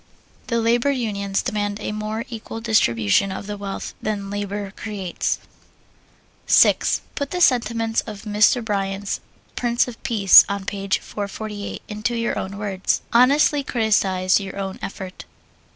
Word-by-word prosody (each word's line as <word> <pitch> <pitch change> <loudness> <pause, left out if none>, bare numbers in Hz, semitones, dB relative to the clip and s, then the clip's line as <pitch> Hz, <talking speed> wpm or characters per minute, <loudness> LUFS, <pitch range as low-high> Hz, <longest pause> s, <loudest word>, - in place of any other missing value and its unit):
The 235 -2 0
labor 235 +4 +2
unions 205 -7 -1
demand 205 -3 -2
a 210 - -4
more 215 +2 -4
equal 225 -1 -7
distribution 195 - +2
of 190 - -6
the 205 0 -5
wealth 200 -1 -6
that 215 0 -1
labor 200 0 -4
creates. 200 -5 -3 1.1
6. - - +4
Put 285 -2 -3
the 360 - -3
sentiments 230 -6 +2
of 210 -2 -8
Mr. 215 +3 +3
Bryan's 200 -1 -2 0.4
"Prince 240 0 +1
of 240 -2 -9
Peace," 215 -8 +7
on 200 -1 -3
page 195 -1 -1
448, 205 0 -6
into 215 +3 -2
your 230 0 -1
own 195 +1 -5
words. 200 -2 -1
Honestly 280 +4 +4
criticise 195 -7 +2
your 195 -1 -7
own 195 -1 -4
effort. 190 -1 -7
210 Hz, 135 wpm, -22 LUFS, 195-230 Hz, 1.1 s, Peace